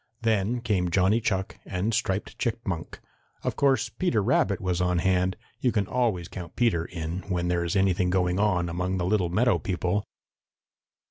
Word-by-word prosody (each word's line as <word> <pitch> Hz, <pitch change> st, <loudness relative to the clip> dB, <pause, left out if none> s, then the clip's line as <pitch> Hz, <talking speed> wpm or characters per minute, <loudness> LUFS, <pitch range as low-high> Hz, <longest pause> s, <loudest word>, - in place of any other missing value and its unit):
Then 110 Hz, +2 st, +1 dB
came 95 Hz, -6 st, 0 dB
Johnny 95 Hz, +6 st, +3 dB
Chuck 95 Hz, -4 st, -2 dB
and 95 Hz, +4 st, -2 dB
Striped 105 Hz, -3 st, -1 dB
Chipmunk. 105 Hz, -8 st, -3 dB, 0.4 s
Of -, -, -1 dB
course 135 Hz, -4 st, +2 dB
Peter 130 Hz, -, 0 dB
Rabbit 125 Hz, -, +2 dB
was 90 Hz, -1 st, -1 dB
on 90 Hz, 0 st, +1 dB
hand. 90 Hz, +1 st, +1 dB, 0.2 s
You 125 Hz, -, +2 dB
can 105 Hz, -3 st, +1 dB
always 110 Hz, -6 st, 0 dB
count 85 Hz, -4 st, -8 dB
Peter 110 Hz, -9 st, +2 dB
in, 85 Hz, 0 st, -4 dB
when 90 Hz, -1 st, 0 dB
there 85 Hz, -1 st, +1 dB
is 85 Hz, +3 st, -2 dB
anything 95 Hz, -2 st, +2 dB
going 90 Hz, 0 st, +1 dB
on 95 Hz, -4 st, +2 dB
among 90 Hz, +2 st, -2 dB
the 90 Hz, -, -1 dB
little 95 Hz, -2 st, +1 dB
meadow 115 Hz, +7 st, +2 dB
people. 95 Hz, 0 st, -1 dB
95 Hz, 165 wpm, -27 LUFS, 90-110 Hz, 0.4 s, Johnny